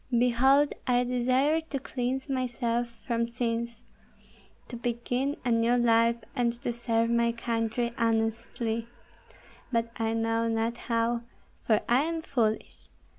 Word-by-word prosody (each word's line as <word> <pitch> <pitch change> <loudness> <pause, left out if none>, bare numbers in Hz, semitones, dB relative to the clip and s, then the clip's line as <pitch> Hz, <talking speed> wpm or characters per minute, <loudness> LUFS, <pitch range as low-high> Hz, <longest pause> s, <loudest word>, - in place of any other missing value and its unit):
Behold 265 +4 +4
I 245 0 +3
desire 255 +5 +2
to 315 -3 -5
cleanse 260 0 -3
myself 240 -3 -1 0.2
from 235 -2 0
sins, 235 0 -3 0.8
to - - -7
begin 245 +4 -2
a 245 - +2
new 230 +1 +3
life, 230 -1 +4 0.2
and 235 -1 0
to 240 - -1
serve 230 -1 0
my 235 0 +3
country 235 0 -1
honestly; 225 0 0 0.8
but 230 -1 0
I 225 -1 0
know 225 0 +1
not 225 +1 0
how, 230 0 +1 0.5
for 215 -2 +4
I 240 +2 +4
am 325 +1 -2
foolish. 225 -7 -2
235 Hz, 125 wpm, -28 LUFS, 230-250 Hz, 0.8 s, Behold